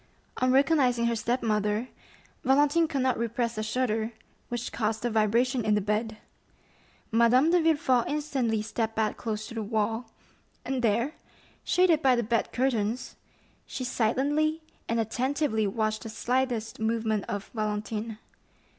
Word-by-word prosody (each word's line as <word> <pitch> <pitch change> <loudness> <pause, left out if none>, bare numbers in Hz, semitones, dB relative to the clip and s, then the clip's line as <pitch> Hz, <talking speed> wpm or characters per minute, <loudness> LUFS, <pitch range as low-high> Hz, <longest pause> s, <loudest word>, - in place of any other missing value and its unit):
On 255 0 +2
recognizing 265 -4 +3
her 235 0 +1
step 240 +3 -1
mother, 210 +2 0 0.5
Valentine 290 +5 +4
could 275 -4 -1
not 260 -3 +1
repress 235 0 -1
a 215 - -2
shudder, 220 0 -1 0.4
which 240 0 -3
caused 220 0 -1
a 240 - 0
vibration 230 +4 +2
in 215 -1 +2
the - - +3
bed. 215 +2 -1 0.9
Madame 240 +7 +4
de 355 -1 +4
Villefort 290 -7 +2
instantly 265 -7 -1
stepped 225 +1 -2
back 220 -1 0
close 215 -1 -4
to 230 - -9
the 225 - -3
wall, 220 +2 -1 0.6
and 265 -1 -1
there, 235 +6 +1 0.5
shaded 360 -4 +3
by 260 -3 +4
the 240 - 0
bed 230 +1 0
curtains, 240 -2 -1 0.5
she 255 - -5
silently 290 +7 0 0.3
and 230 0 +1
attentively 245 0 0
watched 215 +1 -1
the 225 - -7
slightest 240 0 -1
movement 220 -1 0
of 205 0 -4
Valentine. 215 0 -3
235 Hz, 145 wpm, -28 LUFS, 220-260 Hz, 0.9 s, Valentine